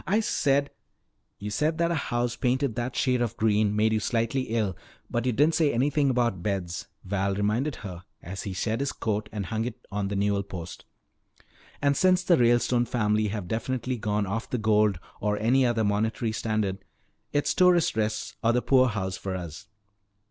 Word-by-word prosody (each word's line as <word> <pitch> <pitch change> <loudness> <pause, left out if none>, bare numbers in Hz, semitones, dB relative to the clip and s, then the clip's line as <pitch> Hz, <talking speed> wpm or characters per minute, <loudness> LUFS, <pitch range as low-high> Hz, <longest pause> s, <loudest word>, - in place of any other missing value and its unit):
"I 205 +3 +3
said 140 -9 +1 0.3
" - - -49
"You 105 +1 -5
said 150 +8 0
that 170 0 +1
a 160 -4 -2
house 120 -1 0
painted 130 0 0
that 120 +2 -3
shade 125 -2 +1
of 120 -4 -2
green 105 -1 +2
made 110 +1 +3
you 110 - +2
slightly 115 +4 -1
ill. 110 -5 0 0.4
But 120 +1 0
you - - +3
didn't 150 +7 +3
say 155 -3 +3
anything 140 +3 +2
about 120 -7 +1
beds," 90 -3 -3 0.2
Val 100 0 -1
reminded 110 +8 0
her 90 -2 -7 0.2
as 95 +3 -7
he 100 - -5
shed 110 +5 -1
his 140 0 -1
coat 105 -1 -2
and 105 -3 -4
hung 110 +5 -2
it 120 -2 -7
on 100 0 -1
the 100 - -3
newel 100 0 +1
post. 90 -3 -8 1.0
"And 140 0 +3
since 185 +1 +3
the 180 - +5
Ralestone 120 -1 +3
family 105 -3 +1
have 100 -3 -4
definitely 125 +4 -2
gone 105 -1 -1
off 110 +5 -3
the 125 - -1
gold 105 -4 +2 0.2
or 105 0 0
any 125 +4 +3
other 115 -2 +1
monetary 110 +2 0
standard, 110 -3 -1 0.5
it's 145 0 +1
tourist 180 - +4
rests 110 0 -2
or 115 +1 +3
the 125 - +1
poorhouse 105 -8 +2
for 95 -1 -4
us." 90 +2 -7
110 Hz, 185 wpm, -27 LUFS, 105-130 Hz, 1.0 s, the